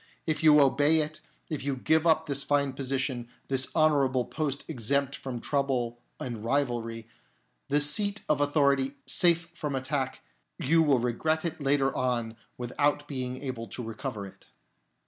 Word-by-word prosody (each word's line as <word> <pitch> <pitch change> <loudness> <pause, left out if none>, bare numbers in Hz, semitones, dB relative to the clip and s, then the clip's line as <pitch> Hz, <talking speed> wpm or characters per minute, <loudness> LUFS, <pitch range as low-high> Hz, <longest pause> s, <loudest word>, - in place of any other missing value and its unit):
If 155 -2 -1
you 150 -2 +7
obey 145 +3 +4
it, 155 +1 -5 0.3
if 155 -5 -4
you 140 -1 -2
give 160 +5 +2
up 160 0 +3
this 140 -2 0
fine 140 -1 +1
position, 130 -2 -2 0.2
this 135 -1 +2
honourable 140 -5 +3
post 145 -3 -3
exempt 140 0 -1
from 130 -3 -6
trouble 125 -4 -1 0.2
and 115 -4 -5
rivalry, 115 -3 -1 0.6
this 145 +1 +5
seat 205 +6 +2
of 150 -1 +1
authority 140 -2 +2
safe 170 -1 +3
from 150 -5 -4
attack, 130 0 -2 0.4
you 165 +4 +3
will 145 -4 +4
regret 155 +7 0
it 160 -2 -3
later 135 -1 +1
on 120 -3 -1 0.2
without 145 +4 0
being 130 -2 -4
able 125 -4 -5
to 120 +5 -7
recover 110 -1 -5
it." 95 - -15
140 Hz, 150 wpm, -28 LUFS, 125-150 Hz, 0.6 s, you